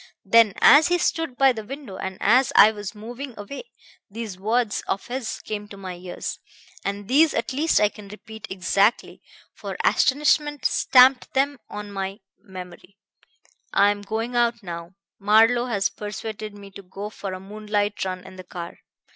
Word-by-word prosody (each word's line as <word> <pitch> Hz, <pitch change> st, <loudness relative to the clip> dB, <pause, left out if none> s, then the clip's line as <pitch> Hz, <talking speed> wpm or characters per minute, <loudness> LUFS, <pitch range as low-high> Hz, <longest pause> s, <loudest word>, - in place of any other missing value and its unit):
Then, 215 Hz, 0 st, +5 dB
as 295 Hz, +2 st, +8 dB
he 355 Hz, 0 st, +2 dB
stood 325 Hz, -6 st, -1 dB
by 270 Hz, -1 st, +5 dB
the 220 Hz, -3 st, -6 dB
window, 265 Hz, -3 st, -8 dB
and 190 Hz, 0 st, -5 dB
as 250 Hz, +5 st, +4 dB
I 215 Hz, -, +8 dB
was 205 Hz, 0 st, -7 dB
moving 240 Hz, +4 st, -8 dB
away, 240 Hz, -, -8 dB, 0.4 s
these 220 Hz, -1 st, -6 dB
words 220 Hz, +3 st, 0 dB
of 195 Hz, -, -2 dB
his 245 Hz, -1 st, -5 dB
came 210 Hz, -1 st, -5 dB
to 200 Hz, -, -11 dB
my 190 Hz, -2 st, -7 dB
ears 180 Hz, 0 st, -6 dB, 0.4 s
and 200 Hz, 0 st, -4 dB
these 300 Hz, +5 st, +4 dB
at 230 Hz, -, -2 dB
least 310 Hz, +5 st, +2 dB
I 210 Hz, -, +4 dB
can 210 Hz, -1 st, -13 dB
repeat 215 Hz, +1 st, -11 dB
exactly, 195 Hz, +4 st, 0 dB, 0.3 s
for -, -, -7 dB
astonishment 295 Hz, +1 st, +2 dB
stamped 255 Hz, 0 st, +5 dB
them 275 Hz, 0 st, +1 dB
on 205 Hz, 0 st, -7 dB
my 195 Hz, +1 st, -4 dB, 0.2 s
memory 185 Hz, +1 st, -11 dB, 0.8 s
'I'm 205 Hz, +1 st, +3 dB
going 225 Hz, +4 st, -4 dB
out 235 Hz, -1 st, +1 dB
now. 170 Hz, 0 st, -8 dB, 0.2 s
Marlowe 225 Hz, +4 st, +4 dB
has 200 Hz, -5 st, 0 dB
persuaded 210 Hz, 0 st, -7 dB
me 200 Hz, -1 st, -12 dB
to 200 Hz, -, -10 dB
go 195 Hz, +3 st, -8 dB
for 195 Hz, -2 st, -6 dB
a 185 Hz, -, -6 dB
moonlight 205 Hz, +1 st, -2 dB
run 185 Hz, -1 st, -5 dB
in 190 Hz, 0 st, -12 dB
the 185 Hz, -, -9 dB
car. 175 Hz, -1 st, -8 dB
210 Hz, 165 wpm, -23 LUFS, 195-245 Hz, 0.8 s, as